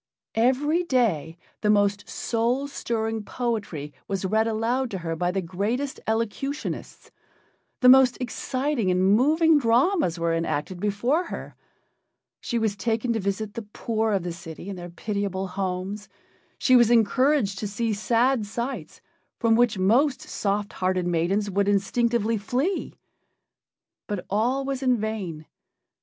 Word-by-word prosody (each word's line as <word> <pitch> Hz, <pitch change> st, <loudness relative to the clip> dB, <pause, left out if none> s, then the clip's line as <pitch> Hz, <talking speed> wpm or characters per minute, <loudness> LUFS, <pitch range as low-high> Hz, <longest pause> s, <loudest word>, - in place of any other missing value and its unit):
Every 265 Hz, +8 st, +2 dB
day 220 Hz, -, 0 dB, 0.2 s
the 210 Hz, -, +1 dB
most 205 Hz, -1 st, +2 dB
soul 240 Hz, +4 st, -1 dB
stirring 225 Hz, -5 st, -2 dB
poetry 205 Hz, -, -3 dB
was 195 Hz, -1 st, -2 dB
read 220 Hz, +4 st, +2 dB
aloud 235 Hz, +4 st, 0 dB
to 195 Hz, -, -4 dB
her 165 Hz, -2 st, -3 dB
by 175 Hz, +2 st, 0 dB
the 190 Hz, +1 st, -1 dB
greatest 215 Hz, +11 st, -2 dB
elocutionists, 230 Hz, +6 st, -3 dB, 0.7 s
the 250 Hz, -, +6 dB
most 260 Hz, -1 st, +7 dB
exciting 255 Hz, -2 st, -1 dB
and 185 Hz, +2 st, +3 dB
moving 310 Hz, +6 st, +4 dB
dramas 250 Hz, -, +2 dB
were 170 Hz, 0 st, 0 dB
enacted 165 Hz, +1 st, -2 dB
before 235 Hz, -, 0 dB
her; -, -, -7 dB, 0.9 s
she 235 Hz, -, -2 dB
was 220 Hz, -3 st, 0 dB
taken 230 Hz, +3 st, -1 dB
to 225 Hz, -, -1 dB
visit 200 Hz, +1 st, -2 dB
the 235 Hz, -, -4 dB
poor 220 Hz, +1 st, -2 dB
of 195 Hz, -3 st, 0 dB
the 175 Hz, -1 st, -3 dB
city 165 Hz, +2 st, -9 dB
in 200 Hz, -, -4 dB
their 175 Hz, -1 st, -8 dB
pitiable 195 Hz, 0 st, -3 dB
homes; 195 Hz, +2 st, -4 dB, 0.5 s
she 255 Hz, -, +4 dB
was 240 Hz, -2 st, +6 dB
encouraged 240 Hz, -1 st, +3 dB
to 210 Hz, -, -2 dB
see 220 Hz, +2 st, -1 dB
sad 230 Hz, +2 st, +1 dB
sights 235 Hz, -, -5 dB, 0.4 s
from 230 Hz, -2 st, +3 dB
which 235 Hz, -3 st, +3 dB
most 250 Hz, +9 st, +3 dB
soft 205 Hz, 0 st, -2 dB
hearted 185 Hz, -1 st, 0 dB
maidens 175 Hz, +4 st, +1 dB
would 200 Hz, 0 st, 0 dB
instinctively 225 Hz, +2 st, +1 dB
flee. 265 Hz, -, -2 dB, 1.1 s
But 205 Hz, -4 st, -4 dB
all 245 Hz, +7 st, +1 dB
was 270 Hz, -1 st, -3 dB
in 255 Hz, -2 st, +3 dB
vain. 200 Hz, -8 st, -4 dB
220 Hz, 140 wpm, -25 LUFS, 195-245 Hz, 1.1 s, most